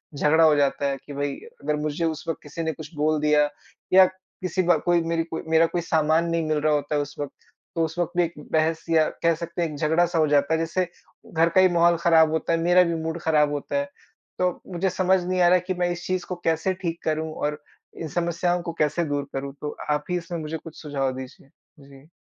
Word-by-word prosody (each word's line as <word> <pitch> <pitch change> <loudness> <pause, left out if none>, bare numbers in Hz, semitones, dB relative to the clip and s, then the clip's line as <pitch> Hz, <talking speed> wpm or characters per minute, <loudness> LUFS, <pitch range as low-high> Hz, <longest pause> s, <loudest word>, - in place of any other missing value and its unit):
झगड़ा 155 +3 +4
हो 155 -2 +6
जाता 140 0 +1
है 135 - -2
कि 145 - -8
भई 140 0 -2 0.3
अगर 150 +1 0
मुझे 155 +2 -1
उस 160 -1 -3
वक़्त 165 - -2
किसी 150 +3 -6
ने 160 - 0
कुछ 155 +2 -10
बोल 155 +1 +1
दिया 150 -1 +3 0.4
या 190 0 +9
किसी 185 -1 -4
ब 175 0 +4
कोई 175 -1 +3
मेरी 165 0 0
कोई 165 0 -5
मेरा 160 +1 +5
कोई 175 +1 -2
सामान 160 0 +2
नहीं 165 -1 0
मिल 155 - +1
रहा 155 0 +2
होता 145 +1 -1
है 145 - +2
उस 145 0 -7
वक़्त 145 -1 -4 0.4
तो 165 - +1
उस 160 +2 -7
वक़्त 175 - 0
भी 175 - +5
एक 170 - -3 0.2
बहस 160 +1 +1
या 160 -1 +5 0.2
कह 170 - +4
सकते 170 +1 -5
हैं 165 - 0
एक 150 - -7
झगड़ा-सा 165 +2 +2
हो 155 - +4
जाता 145 +1 +2
है 160 - +2
जिससे 165 +2 -1 0.5
घर 165 +1 +3
का 185 - +7
ही 185 - +7
माहौल 170 0 +4
ख़राब 160 -2 +5
होता 160 +1 0
है, 165 - +1
मेरा 175 +2 +5
भी 170 -1 -1
मूड 160 +1 -3
ख़राब 150 -2 +3
होता 145 - -4
है। 285 - 0 0.5
तो, 180 -1 0
मुझे 190 +2 0
समझ 185 0 +2
नहीं 185 0 0
आ 175 - +6
रहा 180 - +5
कि 185 - +2
मैं 180 0 0
इस 175 0 -5
चीज़ 185 -1 -1
को 180 - -2
कैसे 165 +3 +1
ठीक 170 -1 -3
करूँ 155 0 -1
और 150 0 -2 0.4
इन 165 - -3
समस्याओं 175 +1 0
को 170 -1 -5
कैसे 150 +3 +1
दूर 145 -1 -2
करूँ 135 0 -4
तो, 150 - -5
आप 150 0 0
ही 180 - +1
इसमें 170 0 -5
मुझे 155 +1 -4
कुछ 160 0 -12
सुझाव 140 -3 -1
दीजिए। 130 +1 -10 0.3
जी। 140 +1 -16
160 Hz, 245 wpm, -24 LUFS, 150-175 Hz, 0.5 s, या